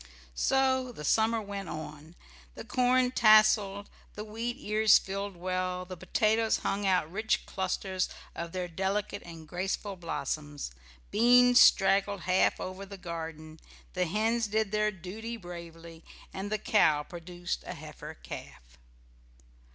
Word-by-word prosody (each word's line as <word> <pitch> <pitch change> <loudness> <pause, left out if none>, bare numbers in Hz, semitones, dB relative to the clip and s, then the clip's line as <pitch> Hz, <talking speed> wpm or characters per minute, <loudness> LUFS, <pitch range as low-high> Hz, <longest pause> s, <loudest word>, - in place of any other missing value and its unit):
So 260 - +1
the 150 -10 -8
summer 225 +6 +3
went 200 -3 -6
on. 155 +1 -8 0.4
The - - -7
corn 250 0 +2
tasselled, 215 -3 +5 0.3
the 210 - -5
wheat 225 +3 -4
ears 215 0 +4
filled 195 0 -4
well, 185 0 -2
the 185 0 -7
potatoes 220 +4 +1
hung 200 0 0
out 180 -4 +1
rich 215 +4 0
clusters 190 0 -2 0.2
of 170 0 -6
their 180 0 -3
delicate 195 +4 -2
and 165 -2 -11
graceful 190 +4 -3
blossoms, 150 - -4 0.4
beans 245 +2 +6
straggled 195 0 +4
half 185 +1 +2
over 185 +1 -6
the 200 0 -9
garden, 160 -3 -7 0.3
the 180 -1 0
hens 220 +5 +1
did 215 -1 0
their 215 0 +2
duty 210 +5 -7
bravely, 170 -3 -10 0.3
and 195 +2 -5
the 215 - +1
cow 200 -10 +3
produced 175 +1 -6
a - - -5
heifer - - -9
calf. - - -11
195 Hz, 135 wpm, -30 LUFS, 170-215 Hz, 0.4 s, beans